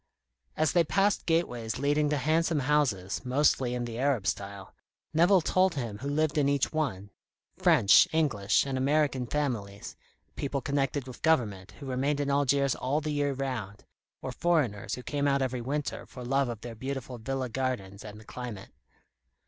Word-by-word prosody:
As 155 -2 +2
they 170 -1 +4
passed 195 +5 +1
gateways 125 -10 0
leading 145 +2 +1
to 150 - +1
handsome 160 +2 +1
houses, 130 -10 0
mostly 130 -1 +2
in 120 -1 -2
the 115 0 -6
Arab 130 -7 +1
style, 100 0 -4 0.4
Nevill 175 +4 +5
told 185 +2 +2
him 115 -7 -4
who 135 - -5
lived 155 +1 +1
in 140 -1 +3
each 140 +1 0
one: 105 -11 -2 0.5
French, 100 - +6
English, 135 -13 +2
and 135 -1 -2
American 140 -2 +1
families; 115 -9 -3 0.4
people 140 0 -2
connected 140 0 -1
with 130 -2 -9
the - - -27
government, 105 - 0
who 140 - -11
remained 135 +3 -1
in 140 -1 0
Algiers 140 -1 +2
all 135 +4 -1
the 155 0 -3
year 145 -1 0
round, 125 -7 -5 0.4
or 130 - -3
foreigners 130 - 0
who 125 - -9
came 145 +1 -1
out 140 -1 +2
every 130 -1 -2
winter 140 +4 -3
for 125 -1 -9
love 135 +1 +1
of 115 -3 -6
their 120 -1 -7
beautiful 130 +1 -5
villa 135 +3 -3
gardens 115 -6 -3
and 105 0 -9
the 110 - -15
climate. 120 -6 -7
135 Hz, 175 wpm, -29 LUFS, 120-145 Hz, 0.5 s, French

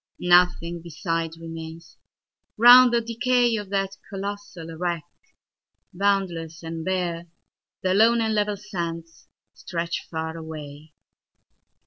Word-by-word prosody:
Nothing 175 -1 +3
beside 165 -1 -3
remains: 165 0 -9 0.6
round 245 +2 +9
the 235 0 +2
decayOf 235 -2 +1
that 195 0 -2
colossal 195 -4 -6
wreck, 170 -1 -2 0.9
boundless 175 -4 -1
and 165 0 -5
bare, 175 -2 -2 0.6
The 185 0 +2
lone 230 +4 +5
and 220 -1 0
level 210 -1 0
sands 170 -5 -6 0.3
stretch 170 -1 -4
far 160 0 -4
away. 155 -2 -9
175 Hz, 100 wpm, -24 LUFS, 165-205 Hz, 0.9 s, round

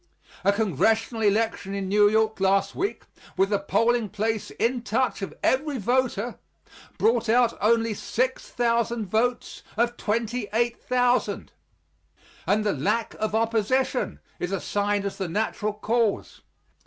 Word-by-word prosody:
A 200 - +5
congressional 220 - +1
election 210 -1 +1
in 195 -1 -3
New 205 +1 +5
York 220 0 +1
last 195 +1 +2
week, 395 +3 -3 0.3
with 195 +1 +3
the 205 -1 +1
polling 230 +2 +1
place 220 +2 -2
in 240 +1 -1
touch 255 -1 0
of 195 - -4
every 280 +1 +1
voter, 245 0 0 0.6
brought 230 0 +2
out 240 +1 +4
only 230 +1 +3
6,000 235 -1 -1
votes 235 +5 -1 0.2
of 235 +1 +1
28,000 235 +2 0 1.0
and 210 +1 +2
the 205 -2 +1
lack 185 - -1
of 215 0 -1
opposition 225 +3 0 0.2
is 180 - -3
assigned 205 +1 -1
as 200 - -4
the 190 -3 -2
natural 210 +2 -1
cause. 220 +1 -1
220 Hz, 125 wpm, -25 LUFS, 205-240 Hz, 1.0 s, A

